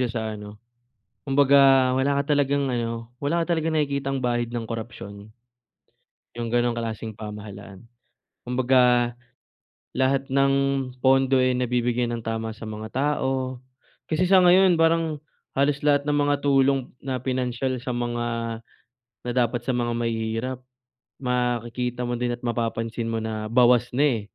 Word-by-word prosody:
siya 125 - +1
sa 115 -1 -3
ano, 105 0 -9 0.7
kumbaga 135 -1 +5
wala 140 +1 +2
ka 145 0 0
talagang 140 -1 +1
ano, 115 -1 -3
wala 150 +6 0
ka 170 0 0
talagang 160 0 -1
nakikitang 140 -3 -1
bahid 120 -1 -1
ng 115 -2 -4
korupsyon. 110 -3 -8 1.0
Yung 115 -1 -4
gano'ng 120 -1 +1
klaseng 110 -2 -5
pamahalaan. 105 -1 -9 0.6
Kumbaga, 125 -1 +3 0.8
lahat 135 +1 +1
ng 135 0 +3 0.5
pondo, 135 +1 +4
eh, 130 0 +3
nabibigay 125 -1 0
ng 115 -1 -5
tama 115 0 -3
sa 115 - -8
mga 110 0 -6
tao. 130 -2 -1 0.5
Kasi 160 +3 +1
sa 190 0 +6
ngayon 180 0 +6
parang 165 -2 +1 0.3
halos 140 +1 +2
lahat 145 -1 +3
ng 145 - +2
mga 145 0 +2
tulong 135 -2 +2
na 130 -2 -4
pinansiyal 130 0 -2
sa 125 +1 -4
mga 120 0 -2 1.0
na 125 - -3
dapat 120 -1 +1
sa - - 0
mga 120 -1 -1
mahihirap 115 +2 -2 0.7
makikita 125 0 -1
mo 120 0 -2
din 120 0 -1
at 120 - -21
mapapansin 115 -1 -2
mo 115 -1 -2
na 110 -1 -4
bawas 120 +1 +4
na, 140 - +3
eh, 125 -7 +2
125 Hz, 145 wpm, -24 LUFS, 115-135 Hz, 1.0 s, sa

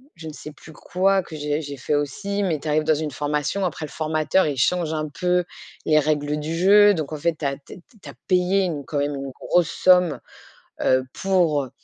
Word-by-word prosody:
je 160 -1 -10
ne 155 - -7
sais 150 - -9
plus 155 +2 -15
quoi 190 +4 +1
que 165 - -10
j'ai 150 0 -2
j'ai 145 -2 -7
fait 140 +3 -1
aussi. 195 +8 -2
Mais 165 -6 -1
tu 150 - -8
arrives 155 +1 +1
dans 155 - +3
une 155 0 -3
formation. 150 +7 -2
Après, 160 -3 -4
le - - -11
formateur, 155 +3 +1
il 145 -2 -3
change 165 +4 +1
un 155 -1 -3
peu 180 +4 0 0.4
les 155 - +4
règles 150 0 -1
du 155 +2 -4
jeu. 205 +3 +6
Donc 155 -4 -4
en - - -3
fait, 170 +3 0
tu 150 - -5
as 140 0 -1
t 140 - -13
t 180 - -15 0.2
tu - - -10
as - - -10
payé 185 +1 +2
une 150 -6 -4
quand 150 -3 -3
même 145 0 -1
une 135 -1 -6
grosse 175 +4 0
somme, 180 -3 +3 0.6
heu, 130 0 +3
pour 170 -8 +1
155 Hz, 230 wpm, -22 LUFS, 145-180 Hz, 0.6 s, jeu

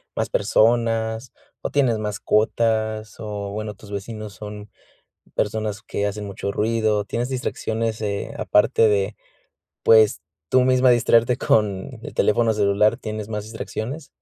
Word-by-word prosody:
más - - -1
personas, 115 - +1 0.3
o - - -3
tienes 130 -6 +2
mascotas 110 +1 0
o 105 -2 -5
bueno, 105 +1 -4
tus 105 +1 -14
vecinos 105 +1 -6
son 105 +2 -9 0.7
personas 105 -1 -1
que 100 +1 -2
hacen 105 +1 -4
mucho 100 0 -4
ruido, 110 -1 +1
tienes 120 +4 -2
distracciones, 115 -3 -2
eh, 100 -2 -3
aparte 105 +2 +3
de, 100 0 +1 0.7
pues, 110 -2 +5 0.3
tú 130 +6 +4
misma 130 0 +4
distraerte 120 0 +4
con 105 +2 0
el - - -8
teléfono 115 +1 +3
celular? 105 +1 +3
¿Tienes 110 -3 -6
más 105 -2 -4
distracciones? 110 - -6
110 Hz, 130 wpm, -22 LUFS, 105-115 Hz, 0.7 s, pues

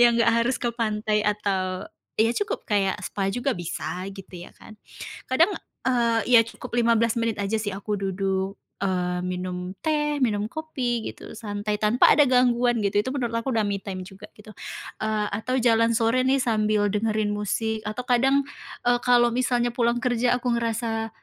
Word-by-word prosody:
ya 240 - +9
nggak 230 0 +4
harus 245 +2 +1
ke 240 - -1
pantai 215 -2 0
atau 195 -3 -1 0.3
ya 225 +2 +4
cukup 415 +1 -2
kayak 195 -2 +1
spa 195 -1 -2
juga 245 +6 -1
bisa 180 +2 -4
gitu, 195 -1 -11 0.2
ya - - -23
kan. 215 - -14 0.5
Kadang, 325 +10 +3 0.4
eee, 235 -2 +2 0.2
ya - - +9
cukup 230 - -10
15 230 -1 +3
menit 230 -1 0
aja 200 +2 0
sih 210 -2 -2
aku 205 +2 -3
duduk, 195 0 -2 0.2
eee, 180 -1 -1
minum 180 0 -4
teh, 295 -2 0
minum 210 -5 +1
kopi 255 -7 -2
gitu, - - -12
santai, 210 -1 -4
tanpa 220 +4 +5
ada 295 - +6
gangguan 245 -2 +3
gitu. 205 +1 +2
Itu 210 - -4
menurut 245 -5 -2
aku 265 +3 -3
udah 220 - +2
me 200 -1 -2
time 185 -2 -6
juga 195 +2 -12
gitu. 215 0 -13 0.5
Eee, 215 -1 0
atau 225 +6 -1
jalan 230 -1 +3
sore 230 +2 +2
nih 270 +1 +3
sambil 215 -2 +2
dengerin 215 0 0
musik 215 +2 -2
atau 230 +4 -4
kadang, 265 +3 +3 0.4
eee, 245 0 +3
kalau 240 -1 +4
misalnya 245 -1 +1
pulang 235 0 +1
kerja 245 0 +1
aku 245 0 -1
ngerasa, 225 -1 -2
225 Hz, 170 wpm, -25 LUFS, 205-245 Hz, 0.5 s, ya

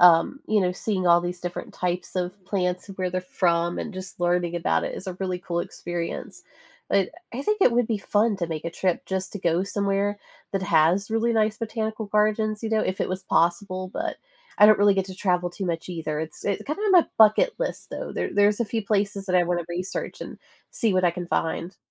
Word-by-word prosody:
um, 175 +10 +6
you 215 -1 +3
know, 180 0 +1
seeing 185 -1 -2
all 170 0 +6
these 175 0 -4
different 175 0 -6
types 180 +1 -2
of 185 +2 -3
plants 180 -1 -1
and 195 - -9
where 185 -1 -1
they're 185 0 -1
from, 175 -1 0
and 220 - -4
just 185 0 -7
learning 175 0 +1
about 80 - +1
it - - -3
is 190 - -7
a 185 - -3
really 185 -1 -1
cool 170 -1 -2
experience. 175 -1 -5 0.5
But 200 -1 +2 0.2
I 270 - -3
think 425 +2 0
it 245 - +6
would 240 -1 +2
be 220 -3 -1
fun 210 +1 +1
to 170 -3 -2
make 160 -1 -5
a 170 - -2
trip 180 0 -1
just 190 0 -2
to 205 - -5
go 170 +1 +2
somewhere 200 0 0 0.3
that 195 -1 -1
has 175 +4 +3
really 225 +1 +1
nice 215 -1 +2
botanical 220 -1 -3
gardens, 215 +1 +1
you 220 - -2
know, 220 -1 +3
if 185 - -2
it - - 0
was 185 0 -3
possible, 185 +2 +1
but - - -3 0.4
I 210 - +8
don't 215 0 +7
really 205 -1 +5
get 190 -1 +1
to 190 - -8
travel 180 -2 0
too 190 +2 -5
much 170 0 -3
either. 155 -3 -3
It's, 160 -1 -6
uh, 200 - +1
kinda 305 +7 -3
on 420 -2 +2
my 355 -3 +7
bucket 220 - +6
list, - - -3
though. - - -5
There - - -2
there's 205 +1 +4
a - - +3
few 225 0 -2
places 200 -1 0
that 185 - -1
I 175 - +5
wanna 175 0 -1
research 180 +2 -4
and - - -9 0.3
see 220 -5 +1
what 185 -1 +3
I 175 - +5
can 175 +1 -6
find. 170 +2 -2
185 Hz, 230 wpm, -25 LUFS, 175-210 Hz, 0.5 s, I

